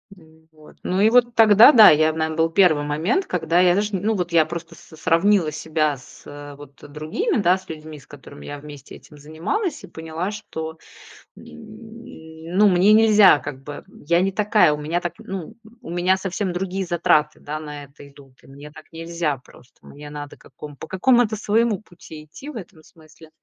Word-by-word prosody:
Ну 160 Hz, -2 st, -23 dB
вот. 155 Hz, -1 st, -19 dB
Ну 185 Hz, +1 st, -2 dB
и 215 Hz, -, +5 dB
вот 240 Hz, -1 st, +3 dB
тогда, 220 Hz, +3 st, +7 dB
да, 225 Hz, -6 st, +8 dB
я, 155 Hz, +1 st, +3 dB
нам 160 Hz, 0 st, -3 dB
был 165 Hz, 0 st, +1 dB
первый 165 Hz, -5 st, +3 dB
момент, 160 Hz, -, -1 dB
когда 170 Hz, -1 st, 0 dB
я 180 Hz, -1 st, +4 dB
даже, 205 Hz, +1 st, -1 dB
ну, 210 Hz, +4 st, -1 dB
вот 175 Hz, -3 st, -3 dB
я 165 Hz, -2 st, +4 dB
просто 170 Hz, +1 st, -8 dB
с -, -, -17 dB
с 160 Hz, -, -15 dB
сравнила 165 Hz, +1 st, +2 dB
себя 155 Hz, -1 st, -2 dB
с, 125 Hz, -, -17 dB
э, 145 Hz, 0 st, -10 dB
вот 140 Hz, -1 st, -15 dB
другими, 155 Hz, -, -3 dB
да, 185 Hz, -2 st, +2 dB
с 190 Hz, 0 st, -18 dB
людьми, 155 Hz, -1 st, -9 dB
с -, -, -21 dB
которыми 145 Hz, 0 st, -13 dB
я 145 Hz, -, -7 dB
вместе 145 Hz, -2 st, -12 dB
этим 150 Hz, -, -17 dB
занималась, 220 Hz, -, -4 dB
и -, -, -10 dB
поняла, 160 Hz, +4 st, -6 dB
что, 160 Hz, -6 st, -8 dB, 0.6 s
м, -, -, -14 dB, 1.1 s
ну, 210 Hz, +1 st, +6 dB
мне 190 Hz, +3 st, +4 dB
нельзя, 215 Hz, -6 st, +6 dB
как 140 Hz, -2 st, -8 dB
бы, 145 Hz, +1 st, -9 dB, 0.2 s
я 170 Hz, +1 st, +3 dB
не 195 Hz, +1 st, 0 dB
такая, 205 Hz, -6 st, +2 dB
у -, -, -4 dB
меня 165 Hz, +4 st, -2 dB
так, 175 Hz, -1 st, -5 dB
ну, 195 Hz, +3 st, -8 dB, 0.3 s
у -, -, -11 dB
меня 180 Hz, +2 st, +1 dB
совсем 190 Hz, 0 st, -4 dB
другие 190 Hz, +1 st, -4 dB
затраты, 155 Hz, -3 st, +1 dB
да, 150 Hz, +1 st, -6 dB
на 150 Hz, -1 st, -9 dB
это 140 Hz, 0 st, -15 dB
идут, 140 Hz, -1 st, -19 dB
и -, -, -19 dB
мне 140 Hz, +2 st, -13 dB
так 155 Hz, +1 st, -15 dB
нельзя 165 Hz, -3 st, -3 dB
просто. 125 Hz, 0 st, -22 dB
Мне 145 Hz, +1 st, -12 dB
надо 145 Hz, -1 st, -9 dB
каком 145 Hz, -1 st, -13 dB
по 160 Hz, -, -10 dB
какому-то 230 Hz, +4 st, +2 dB
своему 220 Hz, 0 st, 0 dB
пути 165 Hz, -5 st, -14 dB
идти 265 Hz, -, -12 dB
в 290 Hz, -, -10 dB
этом 175 Hz, -6 st, -11 dB
смысле, 155 Hz, 0 st, -19 dB
165 Hz, 195 wpm, -21 LUFS, 150-195 Hz, 1.1 s, да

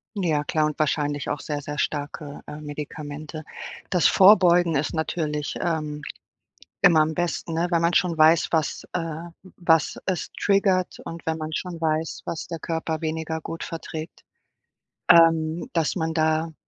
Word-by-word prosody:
Ja, 165 Hz, -7 st, 0 dB
klar 155 Hz, +1 st, +1 dB
und 150 Hz, -1 st, -2 dB
wahrscheinlich 145 Hz, -1 st, 0 dB
auch 145 Hz, -, -2 dB
sehr, 145 Hz, -1 st, -4 dB
sehr 145 Hz, +1 st, -6 dB
starke, 145 Hz, 0 st, -3 dB
äh, 150 Hz, -, -8 dB
Medikamente. 150 Hz, +1 st, -7 dB, 0.5 s
Das 180 Hz, -3 st, +4 dB
Vorbeugen 180 Hz, -4 st, +6 dB
ist 145 Hz, +1 st, 0 dB
natürlich, 155 Hz, -2 st, -2 dB
ähm, 155 Hz, -3 st, -2 dB, 0.8 s
immer 175 Hz, -5 st, +6 dB
am 155 Hz, +1 st, -1 dB
besten, 175 Hz, -1 st, -2 dB
ne, 170 Hz, +2 st, 0 dB
wenn 170 Hz, -2 st, +2 dB
man 170 Hz, +1 st, +2 dB
schon 175 Hz, -2 st, +2 dB
weiß, 155 Hz, +1 st, +5 dB
was, 160 Hz, -3 st, -1 dB
äh 165 Hz, -1 st, -3 dB, 0.3 s
was 165 Hz, -4 st, +2 dB
es 185 Hz, -3 st, -2 dB
triggert 195 Hz, -2 st, +1 dB
und 165 Hz, 0 st, -8 dB
wenn 160 Hz, 0 st, 0 dB
man 155 Hz, 0 st, -5 dB
schon 175 Hz, +2 st, -4 dB
weiß, 160 Hz, 0 st, -1 dB
was 165 Hz, -, -4 dB
der 165 Hz, -1 st, -5 dB
Körper 160 Hz, 0 st, -3 dB
weniger 160 Hz, 0 st, -3 dB
gut 165 Hz, +1 st, -6 dB
verträgt. 160 Hz, 0 st, -7 dB, 0.9 s
Ähm, 165 Hz, 0 st, +5 dB
dass 165 Hz, -3 st, +1 dB
man 160 Hz, -1 st, -1 dB
da 160 Hz, 0 st, +1 dB
160 Hz, 155 wpm, -24 LUFS, 155-170 Hz, 0.9 s, Vorbeugen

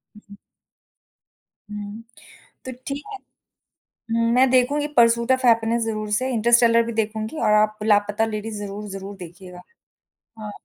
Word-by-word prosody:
हुँ, 210 Hz, -, -15 dB
हुँ। 200 Hz, -, -13 dB, 1.3 s
हुँ, 210 Hz, +1 st, -7 dB, 0.6 s
तो 260 Hz, -, -5 dB, 0.2 s
ठीक 280 Hz, +1 st, -4 dB
है, -, -, -6 dB, 0.9 s
उम, 230 Hz, 0 st, +1 dB
मैं 260 Hz, 0 st, +4 dB
देखूँगी 280 Hz, +4 st, +2 dB
परसूट 235 Hz, +1 st, +4 dB
ऑफ 260 Hz, 0 st, +1 dB
हैप्पीनेस 230 Hz, 0 st, +3 dB
ज़रूर 215 Hz, -1 st, -3 dB
से, 255 Hz, +5 st, 0 dB
इंटरस्टेलर 235 Hz, 0 st, +4 dB
भी 235 Hz, -, -5 dB
देखूँगी 220 Hz, +4 st, -3 dB
और 215 Hz, -2 st, +3 dB
आप 215 Hz, 0 st, +2 dB
लापता 210 Hz, 0 st, +2 dB
लेडीज़ 215 Hz, -1 st, -5 dB
ज़रूर, 205 Hz, +1 st, -7 dB
ज़रूर 195 Hz, +1 st, -8 dB
देखिएगा। 180 Hz, 0 st, -11 dB, 0.8 s
हाँ। 210 Hz, -1 st, -6 dB
220 Hz, 140 wpm, -22 LUFS, 210-235 Hz, 1.3 s, मैं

